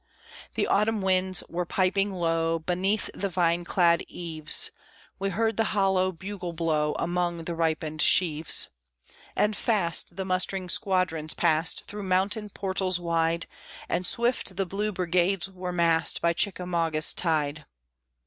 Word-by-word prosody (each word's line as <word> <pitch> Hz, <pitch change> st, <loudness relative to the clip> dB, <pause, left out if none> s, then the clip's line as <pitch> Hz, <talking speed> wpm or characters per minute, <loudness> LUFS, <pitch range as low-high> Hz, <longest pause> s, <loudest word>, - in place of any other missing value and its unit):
The -, -, +1 dB
autumn 210 Hz, 0 st, +1 dB
winds 185 Hz, -1 st, +1 dB
were 175 Hz, +1 st, -3 dB
piping 195 Hz, +3 st, 0 dB
low, 165 Hz, -2 st, 0 dB
Beneath 185 Hz, +5 st, -1 dB
the 200 Hz, -, -3 dB
vine 170 Hz, -1 st, +1 dB
clad 170 Hz, -1 st, +3 dB
eaves; 160 Hz, -3 st, 0 dB, 0.5 s
We 195 Hz, 0 st, -1 dB
heard 225 Hz, +4 st, -1 dB
the 225 Hz, -, +3 dB
hollow 190 Hz, -1 st, +2 dB
bugle 185 Hz, 0 st, -7 dB
blow 155 Hz, -2 st, 0 dB
Among 175 Hz, -1 st, -1 dB
the 170 Hz, -, -4 dB
ripened 160 Hz, -2 st, -1 dB
sheaves. 160 Hz, -2 st, +3 dB, 0.7 s
And 210 Hz, 0 st, +1 dB
fast 175 Hz, -7 st, +1 dB
the 190 Hz, -, -4 dB
mustering 185 Hz, 0 st, 0 dB
squadrons 185 Hz, -6 st, +1 dB
passed 160 Hz, -1 st, +2 dB
Through 205 Hz, 0 st, -7 dB
mountain 200 Hz, +3 st, 0 dB
portals 190 Hz, -2 st, -1 dB
wide, 165 Hz, -1 st, 0 dB, 0.4 s
And 180 Hz, -, -1 dB
swift 235 Hz, -1 st, 0 dB
the 195 Hz, +1 st, -1 dB
blue 205 Hz, +4 st, -2 dB
brigades 185 Hz, +1 st, 0 dB
were 180 Hz, -1 st, -5 dB
massed 170 Hz, -2 st, +2 dB
By 170 Hz, 0 st, +1 dB
Chickamauga's 170 Hz, -4 st, +1 dB
tide. 155 Hz, -3 st, -1 dB
180 Hz, 135 wpm, -26 LUFS, 165-195 Hz, 0.7 s, clad